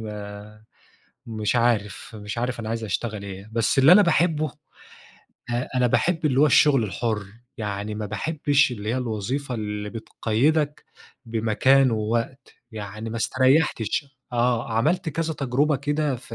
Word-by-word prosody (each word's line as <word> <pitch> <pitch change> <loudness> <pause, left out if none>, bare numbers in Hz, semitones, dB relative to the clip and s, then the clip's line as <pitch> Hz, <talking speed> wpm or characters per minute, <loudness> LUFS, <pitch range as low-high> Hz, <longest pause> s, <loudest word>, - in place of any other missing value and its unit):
ما 105 0 -8 0.6
مش 110 0 -1
عارف، 115 -4 0
مش 105 +3 -6
عارف 120 0 -2
أنا 110 - -5
عايز 115 0 -3
أشتعل 105 +1 -3
إيه؟ 100 +1 -8
بس 115 +3 +1
اللِّي 140 +5 +8
أنا 205 +3 +8
باحبه، 160 -3 +2 1.0
آآ 120 +1 -1
أنا 125 -1 +3
بأحب 160 +7 +1
اللي 135 -2 +2
هو 150 - +6
الشغل 135 -3 +5
الحُر، 105 +2 -2 0.3
يعني 105 0 -4
ما 105 0 -4
باحبش 145 +5 +1
اللِّي 105 -3 -6
هي 120 - 0
الوظيفة 125 +3 -3
اللِّي 105 -2 -4
بتقيدك 140 +7 0 0.4
بمكان 115 +4 +3
ووقت، 115 +4 -2 0.2
يعني 105 +1 -6
ما 115 - -4
استريحتش 130 +1 +1 0.3
آه، 120 -1 0
عَمَلت 155 +10 +1
كَذَا 160 +1 -2
تجربة 140 +2 +1
كده 145 0 -1
ف 115 -1 -11
120 Hz, 145 wpm, -24 LUFS, 110-140 Hz, 1.0 s, اللِّي